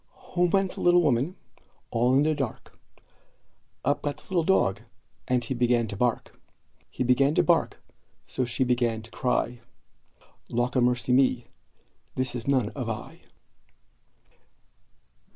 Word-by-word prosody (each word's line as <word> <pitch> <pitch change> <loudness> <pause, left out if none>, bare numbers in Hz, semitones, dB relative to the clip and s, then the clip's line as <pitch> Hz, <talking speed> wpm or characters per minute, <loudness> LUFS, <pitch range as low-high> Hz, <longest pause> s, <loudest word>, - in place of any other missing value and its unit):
Home 175 0 +3
went 195 0 +1
the - - -7
little 175 0 +5
woman, 145 +4 +1 0.6
all 120 +3 +2
in 140 - +4
the 155 +1 +2
dark; 135 -6 -5 1.1
Up 145 +2 +1
got 145 -1 -3
the - - -17
little 180 -3 +1
dog, 105 - +2 0.5
and 125 -2 +1
he 130 - -2
began 120 -1 +2
to 100 - -4
bark; 120 +3 -2 0.5
He - - -3
began 135 +4 +3
to - - +4
bark, - - +1 0.5
so 130 - -2
she 120 +2 -1
began 120 -3 0
to 115 - -12
cry 125 -1 -1 0.9
"Lawkamercyme, 125 +1 +2 0.7
this 130 -1 -1
is 120 0 -6
none 130 -6 +2
of 125 -3 -5
I!" 110 - -7
125 Hz, 135 wpm, -26 LUFS, 120-145 Hz, 1.1 s, little